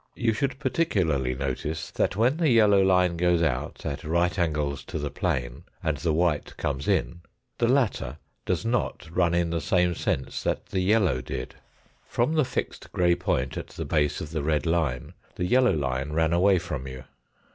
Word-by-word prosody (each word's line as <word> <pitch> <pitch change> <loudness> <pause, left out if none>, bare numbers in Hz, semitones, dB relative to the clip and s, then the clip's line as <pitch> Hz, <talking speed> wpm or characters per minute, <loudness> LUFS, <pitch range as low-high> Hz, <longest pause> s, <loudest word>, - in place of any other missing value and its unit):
You 115 -2 +1
should 135 +4 -1
particularly 95 - 0
notice 70 +4 -3
that - - 0
when 120 +8 +2
the 165 -3 +2
yellow 105 -5 +5
line 90 -2 +3
goes 90 -1 +2
out, 65 -5 -2
at 70 - -4
right 85 +4 +1
angles 75 -4 -1
to - - -5
the 75 -2 -3
plane, 60 +4 -2 0.2
and 80 -3 0
the 80 +3 0
white 80 -1 0
comes 70 0 -2
in, 85 - 0 0.4
the 115 - +3
latter 120 - +1 0.3
does - - -1
not 115 -6 -1
run 85 -1 +3
in 85 -1 +1
the 85 -1 -1
same 90 +3 +2
sense 65 -4 -2
that - - -1
the 95 - -1
yellow 95 - +2
did. 60 - -5 0.5
From 125 +4 0
the 155 -1 +3
fixed 125 - -4
grey 85 -1 +3
point 65 -6 -1
at - - -5
the - - -6
base 75 -1 0
of 75 - -6
the 80 - -2
red 75 +2 0
line 80 -7 -1 0.2
the 90 - -2
yellow 125 +2 +4
line 70 0 -2
ran 80 +1 +2
away 95 +2 +4
from 75 -6 -4
you. 65 0 -8
85 Hz, 185 wpm, -26 LUFS, 75-100 Hz, 0.5 s, yellow